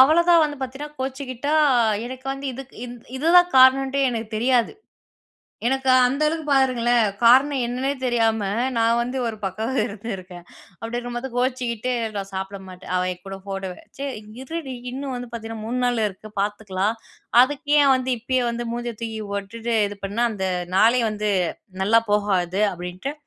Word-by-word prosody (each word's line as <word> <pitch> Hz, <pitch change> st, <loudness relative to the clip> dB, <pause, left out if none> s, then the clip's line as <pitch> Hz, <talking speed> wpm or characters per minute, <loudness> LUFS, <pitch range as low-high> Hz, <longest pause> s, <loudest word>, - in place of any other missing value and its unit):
அவள 310 Hz, +6 st, +7 dB
தான் 335 Hz, -2 st, +7 dB
வந்து 295 Hz, -1 st, -3 dB
பாத்தீங்கன்னா 275 Hz, +3 st, -6 dB
கோச்சுக்கிட்டா, 265 Hz, +2 st, -3 dB, 0.5 s
எனக்கு 260 Hz, +1 st, -9 dB
வந்து 275 Hz, +1 st, -6 dB
இதுக்கு 265 Hz, +1 st, -10 dB
இது 240 Hz, -, -8 dB, 0.2 s
இது 305 Hz, -, -2 dB
தான் 355 Hz, 0 st, +3 dB
காரணோன்டே 270 Hz, +1 st, +5 dB
எனக்குத் 225 Hz, -2 st, -4 dB
தெரியாது. 245 Hz, 0 st, +2 dB, 1.0 s
எனக்கு 265 Hz, 0 st, 0 dB, 0.2 s
அந்த 275 Hz, +4 st, -2 dB
அளவுக்கு 320 Hz, 0 st, -2 dB
பாருங்களேன், 245 Hz, -4 st, +3 dB, 0.2 s
காரணம் 260 Hz, +3 st, +5 dB
என்னன்னே 255 Hz, +3 st, -1 dB
தெரியாம 225 Hz, -3 st, +2 dB, 0.4 s
நான் 230 Hz, +1 st, +3 dB
வந்து 250 Hz, +2 st, -2 dB
ஒரு 220 Hz, -1 st, -4 dB
பக்கம் 215 Hz, +6 st, -3 dB
இருந்துருக்கேன் 195 Hz, -5 st, -7 dB, 0.4 s
அப்படி 225 Hz, +1 st, -5 dB
இருக்கும்போது 245 Hz, +2 st, -4 dB
கோச்சுக்கிட்டு 250 Hz, -1 st, -1 dB, 0.2 s
நான் 195 Hz, -1 st, -4 dB
சாப்பிட 190 Hz, +1 st, -4 dB
மாட்டேன். 185 Hz, -1 st, -10 dB
அவன் 185 Hz, 0 st, +1 dB
என் 180 Hz, -, -19 dB
கூட 195 Hz, 0 st, -6 dB
போட்டோவ 195 Hz, -2 st, -4 dB, 0.2 s
சரி 275 Hz, 0 st, -3 dB, 0.3 s
இருடி 275 Hz, -1 st, -5 dB, 0.2 s
இன்னும் 270 Hz, +1 st, -4 dB
வந்து 245 Hz, -1 st, -6 dB
பாத்தீங்கன்னா 225 Hz, -1 st, -6 dB
3 245 Hz, +3 st, -2 dB
நாள் 245 Hz, -2 st, +1 dB
இருக்கு 205 Hz, +2 st, -10 dB
பாத்துக்கலாம். 205 Hz, 0 st, -1 dB, 0.5 s
அதுக்கு 290 Hz, +3 st, 0 dB
ஏன் 275 Hz, -, +5 dB
வந்து 255 Hz, 0 st, -1 dB
இப்பயே 255 Hz, +3 st, 0 dB
வந்து 235 Hz, +1 st, -3 dB
மூஞ்சிய 240 Hz, 0 st, -3 dB
தூக்கி 225 Hz, -1 st, -4 dB
போட்டுட்டு 225 Hz, +4 st, -3 dB
இது 205 Hz, -, -8 dB
பண்ணா 205 Hz, +5 st, 0 dB
அந்த 190 Hz, -3 st, -3 dB, 0.3 s
நாளே 230 Hz, +5 st, +5 dB
வந்து 210 Hz, 0 st, -2 dB, 0.5 s
நல்லா 225 Hz, +4 st, +5 dB
போகாது! 195 Hz, -2 st, +1 dB
அப்டின்ட்டு, 180 Hz, +10 st, -5 dB
240 Hz, 155 wpm, -23 LUFS, 210-265 Hz, 1.0 s, அவள